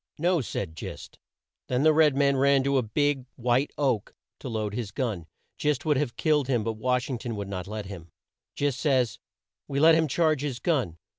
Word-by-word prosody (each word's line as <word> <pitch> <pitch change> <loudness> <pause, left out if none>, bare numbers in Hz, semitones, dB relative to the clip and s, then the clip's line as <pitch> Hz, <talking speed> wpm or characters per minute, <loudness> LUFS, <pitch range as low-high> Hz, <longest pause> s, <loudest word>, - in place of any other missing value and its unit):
"No," 175 +1 +2
said 95 -8 -4
Gist. - - -8 0.5
Then 125 +2 0
the 155 0 +6
red 150 -3 +4
man 140 0 +3
ran 135 0 +4
to 140 0 +2
a - - +2
big 135 +3 0
white 125 +3 +1
oak 130 -8 +1
tree - - -23 0.2
to - - -6
load 110 -3 -2
his 115 -2 -3
gun. 100 -6 -3 0.3
Gist 150 -1 0
would 150 -3 +2
have 135 -4 -1
killed 150 -4 +2
him, 120 -5 +1
but 115 - -1
Wash 125 +3 0
ing 130 -4 -3
ton 120 -1 -4
would 100 -1 -5
not 95 -2 -5
let 105 0 -5
him. 90 -4 -9 0.5
Gist 140 -3 -1
says, 130 -6 +1 0.5
"We 140 -1 -2
let 160 +2 +7
him 160 0 +3
charge 155 0 +1
his 140 -4 -3
gun. 125 - -1
130 Hz, 210 wpm, -27 LUFS, 110-145 Hz, 0.5 s, let